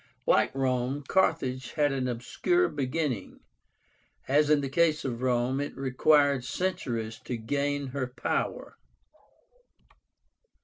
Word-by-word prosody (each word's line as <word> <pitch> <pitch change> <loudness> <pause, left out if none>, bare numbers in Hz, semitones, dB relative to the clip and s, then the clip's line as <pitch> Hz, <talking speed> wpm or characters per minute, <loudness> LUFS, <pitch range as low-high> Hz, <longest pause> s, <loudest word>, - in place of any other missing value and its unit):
Like - - +3
Rome, 130 +1 0
Carthage 130 -9 0
had 145 -2 +2
an 130 -2 -1
obscure 125 - 0
beginning. 135 - -3 0.9
As 145 +2 +3
in 150 -1 +4
the 140 - -2
case 155 +2 +2
of 120 -2 -3
Rome, 125 +1 +1
it 145 - -5
required 140 +1 +3
centuries 120 -8 -3
to 125 - -3
gain 140 +4 -1
her 130 -1 -3
power. 125 - -3
135 Hz, 115 wpm, -28 LUFS, 125-145 Hz, 0.9 s, in